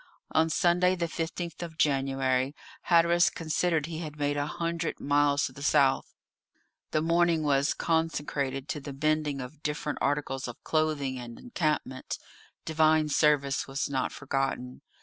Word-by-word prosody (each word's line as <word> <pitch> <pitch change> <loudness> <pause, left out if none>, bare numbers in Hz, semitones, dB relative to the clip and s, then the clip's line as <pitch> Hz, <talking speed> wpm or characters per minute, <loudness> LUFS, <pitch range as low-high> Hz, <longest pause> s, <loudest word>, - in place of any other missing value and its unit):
On 160 +1 +3
Sunday, 180 +2 +3
the 170 -2 -1
15th 170 +1 -4
of 165 -2 -7
January, 135 -1 +1 0.3
Hatteras 170 0 +5
considered 160 -1 0
he 160 0 -5
had 155 -3 -6
made 145 0 0
a 145 0 -1
hundred 170 +1 -3
miles 145 0 +2
to - - -4
the 140 - -12
south; 140 -1 +2 0.7
the 155 - 0
morning 170 -1 +3
was 140 0 +2
consecrated 145 -4 -1
to 150 - -2
the 140 -1 -8
mending 155 -2 +1
of 135 +4 -9
different 150 -1 -3
articles 140 -2 -1
of 120 - -9
clothing 150 -5 0
and 120 -1 -8
encampment; 155 - -2 0.5
divine 155 -1 +3
service 145 -2 +2
was 135 +1 -2
not 130 -2 0
forgotten. 135 -2 -3
150 Hz, 145 wpm, -28 LUFS, 135-160 Hz, 0.7 s, Hatteras